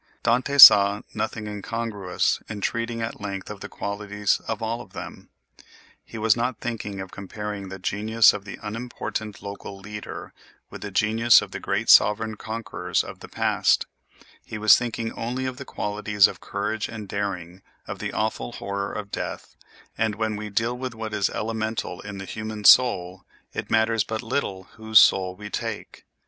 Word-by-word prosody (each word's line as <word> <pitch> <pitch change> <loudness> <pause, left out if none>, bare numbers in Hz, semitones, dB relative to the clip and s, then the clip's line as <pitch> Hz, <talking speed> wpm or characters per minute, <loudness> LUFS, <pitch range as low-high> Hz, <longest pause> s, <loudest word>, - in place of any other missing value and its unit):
Dante 130 +4 +1
saw 100 -5 +10
nothing 110 -1 -3
incongruous 105 -2 -2
in 110 -1 -5
treating 115 +2 -2
at 115 -1 -5
length 100 -1 -5
of 105 - -8
the - - -8
qualities 105 0 -2
of 110 - -2
all 115 +1 -3
of - - -14
them; - - -9 0.7
he 115 - -10
was 110 0 +3
not 120 0 -1
thinking 105 -4 -5
of 95 -1 -7
comparing 100 0 -6
the 95 - -7
genius 110 +4 +3
of 100 - -6
the 100 - -8
unimportant 110 -1 -5
local 100 0 -7
leader 105 +2 -8 0.4
with - - -9
the 105 - -5
genius 110 +3 +5
of - - -7
the - - -5
great - - -2
sovereign 110 +1 +5
conquerors 110 -5 -3
of - - -10
the - - -10
past—he 110 - -2
was 110 0 +7
thinking 115 -1 -3
only 125 +3 -3
of 130 -1 -4
the - - -8
qualities 105 0 +1
of - - -9
courage 105 +2 -3
and 110 -2 -7
daring 95 -4 -3
and - - -44 0.2
of - - -6
the - - -3
awful - - -2
horror 100 0 -4
of 100 -1 -6
death; - - -5 0.4
and 110 -2 +1
when 110 0 -1
we 105 0 -6
deal 115 +4 0
with 125 -1 -5
what 110 -1 -6
is 105 -2 +1
elemental 110 -4 -3
in 100 -1 -8
the 95 - -6
human 110 +1 -6
soul 95 -7 +5 0.3
it - - -5
matters 110 0 +2
but 110 +1 -4
little 110 -6 -2
whose 110 0 +2
soul 95 -2 +5
we 105 +3 -9
take. 115 +1 -6
105 Hz, 175 wpm, -24 LUFS, 100-115 Hz, 0.7 s, saw